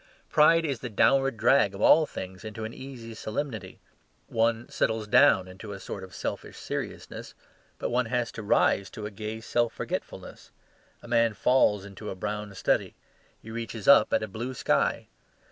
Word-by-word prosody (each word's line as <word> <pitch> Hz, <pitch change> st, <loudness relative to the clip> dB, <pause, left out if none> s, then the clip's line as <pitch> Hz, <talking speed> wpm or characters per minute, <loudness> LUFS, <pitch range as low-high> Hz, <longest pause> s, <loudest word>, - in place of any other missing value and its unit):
Pride 165 Hz, +2 st, +5 dB
is 140 Hz, -6 st, -2 dB
the 125 Hz, -, -5 dB
downward 135 Hz, +3 st, +3 dB
drag 105 Hz, -5 st, +3 dB
of 100 Hz, -, -7 dB
all 155 Hz, +5 st, +6 dB
things 95 Hz, +1 st, -8 dB
into 110 Hz, 0 st, -6 dB
an 110 Hz, -, -6 dB
easy 125 Hz, -4 st, -9 dB
solemnity. 110 Hz, -3 st, -5 dB, 0.5 s
One 115 Hz, +1 st, 0 dB
"settles 110 Hz, -1 st, -1 dB
down" 95 Hz, -2 st, +5 dB
into 95 Hz, +3 st, -9 dB
a 100 Hz, -, -8 dB
sort 95 Hz, 0 st, -7 dB
of 95 Hz, -1 st, -11 dB
selfish -, -, -5 dB
seriousness; -, -, -6 dB, 0.4 s
but -, -, -3 dB
one 125 Hz, 0 st, +1 dB
has 120 Hz, 0 st, -1 dB
to -, -, -7 dB
rise 100 Hz, -1 st, +2 dB
to 105 Hz, -, -8 dB
a 105 Hz, -, -5 dB
gay 110 Hz, +2 st, -6 dB
self 120 Hz, 0 st, 0 dB
forgetfulness. -, -, -6 dB, 0.5 s
A -, -, -11 dB
man 115 Hz, -2 st, +2 dB
"falls" 105 Hz, -2 st, +3 dB
into 100 Hz, +1 st, -8 dB
a -, -, -5 dB
brown 105 Hz, +1 st, -5 dB
study; -, -, 0 dB, 0.5 s
he 110 Hz, -, -9 dB
reaches 115 Hz, -2 st, -6 dB
up 140 Hz, -6 st, +7 dB
at -, -, +2 dB
a -, -, -3 dB
blue 120 Hz, +6 st, -5 dB
sky. -, -, +1 dB
110 Hz, 175 wpm, -27 LUFS, 105-120 Hz, 0.5 s, up